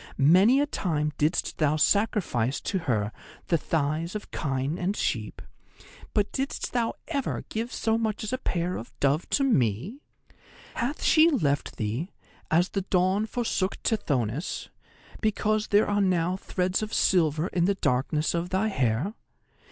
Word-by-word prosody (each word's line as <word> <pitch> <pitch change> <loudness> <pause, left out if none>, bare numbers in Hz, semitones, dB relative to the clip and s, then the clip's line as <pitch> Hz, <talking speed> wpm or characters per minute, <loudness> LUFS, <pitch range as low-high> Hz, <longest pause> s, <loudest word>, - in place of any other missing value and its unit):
Many 185 - +6
a 290 - +3
time 155 - -1
didst 155 +4 0
thou 155 -1 +3
sacrifice 155 - +1
to 190 - -1
her 105 -2 +1 0.4
the 170 - +4
thighs 160 +4 -1
of 210 - -6
kine 135 +2 -2
and 190 +3 -1
sheep, 110 -3 -2 0.7
but 205 -1 +1
didst 270 +1 -3
thou 235 -2 0
ever 280 -5 -2
give 230 +3 -3
so 225 0 0
much 220 -2 -2
as 215 - -4
a 255 - -1
pair 180 -5 -1
of 115 - -10
dove 140 +4 +1
to 280 - +2
me? 145 - +1 0.7
Hath 260 +6 -3
she 320 +1 +6
left 145 - 0
thee, 115 - -3 0.4
as 175 +3 +3
the 195 - -2
Dawn 190 +3 +1
forsook 215 -5 -1
Tithonus, 140 - -1 0.5
because 215 0 +1
there 205 +1 +4
are 205 0 +1
now 180 -2 +1
threads 185 0 -1
of 215 0 -3
silver 160 -3 +2
in 175 -1 +1
the 200 +1 +2
darkness 150 0 0
of 170 +1 -2
thy 190 +4 +1
hair? 135 - 0
180 Hz, 150 wpm, -27 LUFS, 150-215 Hz, 0.7 s, Many